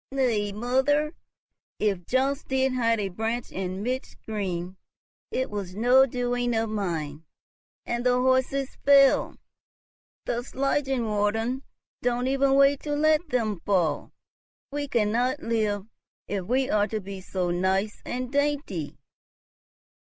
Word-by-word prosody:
"Nay, 235 -7 +1
mother, 265 +8 +1 0.6
if 195 -5 -1
Jobst 270 +3 0
did 265 0 +1
hide 230 -3 +2
a 200 -2 -1
branch 225 +5 -3
in 190 +1 -4
midstream, 200 -7 -4 0.5
it 260 -2 -2
was 195 -3 -5
no 250 +5 +5
doing 245 -1 -1
of 225 -1 0
mine; 165 -7 -3 0.6
and 240 0 -2
the 250 0 +3
horses 260 +1 +1
fell. 275 -1 +5 0.9
The 240 0 -1
Schlangenwaldern 245 -3 0 0.4
don't 245 0 0
even 270 +1 +3
wait 275 0 +5
to 295 -1 -3
let 310 +2 +2
them 220 - 0
fall. 170 -6 0 0.6
We 290 0 -3
cannot 240 +3 +1
live, 215 -3 0 0.4
if 195 -3 -3
we 255 +5 +1
are 210 -3 +2
to 220 +1 -3
be 195 -1 -8
so 180 -1 -2
nice 190 +4 0
and 250 0 -4
dainty." 285 - -1
240 Hz, 125 wpm, -26 LUFS, 205-265 Hz, 0.9 s, no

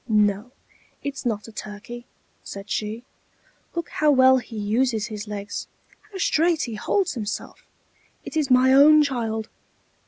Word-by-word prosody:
"No, 210 +2 +2 0.5
it's 275 -2 -4
not 210 -2 -2
a - - -10
turkey," 220 +3 -8 0.4
said 200 +1 -9
she: 215 +2 -3 0.7
"look 340 - -3
how 305 - +1
well 260 -2 +6
he 235 -2 -10
uses 220 +1 0
his 215 -1 -7
legs, 205 -1 -5 0.4
how 390 - -7
straight 335 -2 +2
he 235 - -4
holds 365 - 0
himself. 210 -3 -5 0.6
It - - -8
is 300 -3 +1
my 255 +1 +5
own 300 +2 +7
child! 225 -5 -2
240 Hz, 145 wpm, -24 LUFS, 210-275 Hz, 0.7 s, own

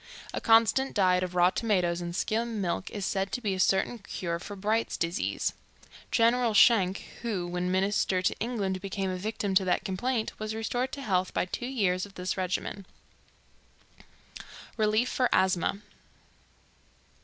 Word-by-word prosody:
A - - -3
constant 230 +4 +4
diet 185 -3 +3
of 180 -1 -4
raw 180 +1 +5
tomatoes 180 -6 0
and 170 0 -5
skim 225 +2 -1
milk 185 -1 -2
is 205 -3 -4
said 195 0 -1
to - - -1
be 210 -5 -1
a 190 - -4
certain 190 +5 +2
cure 170 -3 -4
for 205 - -8
Bright's 215 +4 -1
disease. 170 +3 -1 0.6
Gen. 230 -1 +4 0.2
Schenck, 200 -4 +5 0.2
who, 210 -7 -2
when 180 +1 -2
Minister 190 0 +1
to - - +1
England, 200 -6 -2
became 195 -1 -3
a - - -2
victim 205 +1 -3
to 190 0 +3
that 180 - 0
complaint, 220 +5 -1
was 215 0 -3
restored 245 +3 -2
to 280 - -5
health 185 -5 0
by - - +1
two 240 +6 -5
years 195 -7 0
of 195 - -19
this 180 0 -2
regimen. 190 +1 -3 1.9
Relief 215 +2 +2
for 255 -1 +1
Asthma. 190 +1 +2
195 Hz, 155 wpm, -28 LUFS, 185-225 Hz, 1.9 s, raw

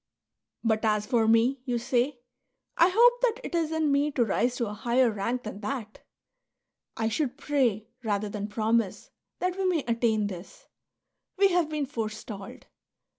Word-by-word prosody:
" 110 - -59
But 220 +1 0
as 210 -1 +1
for 230 -2 +2
me," 235 +4 +3
you 245 -2 -1
say, 245 +2 0 0.3
" - - -54
I 340 - +5
hope 485 +5 +5
that - - +1
it - - -6
is 330 -2 0
in 320 -2 +1
me 285 +1 +2
to 240 -4 +2
rise 240 +4 +1
to 240 - -1
a 210 - -5
higher 240 +2 +2
rank 230 +5 -2
than 215 -2 -7
that! 220 -2 -5 0.5
" - - -59
I 225 - 0
should 260 +4 -1
pray, 250 -8 0 0.2
rather 210 -1 -1
than 205 0 -4
promise, 220 -1 -1 0.3
that 365 +1 -2
we 385 - 0
may 345 -6 +1
attain 230 -2 +1
this; 185 -2 -8 0.7
we 395 0 +5
have 350 -4 +1
been 305 -2 -1
forestalled. 215 -5 -6
240 Hz, 180 wpm, -27 LUFS, 215-295 Hz, 0.7 s, I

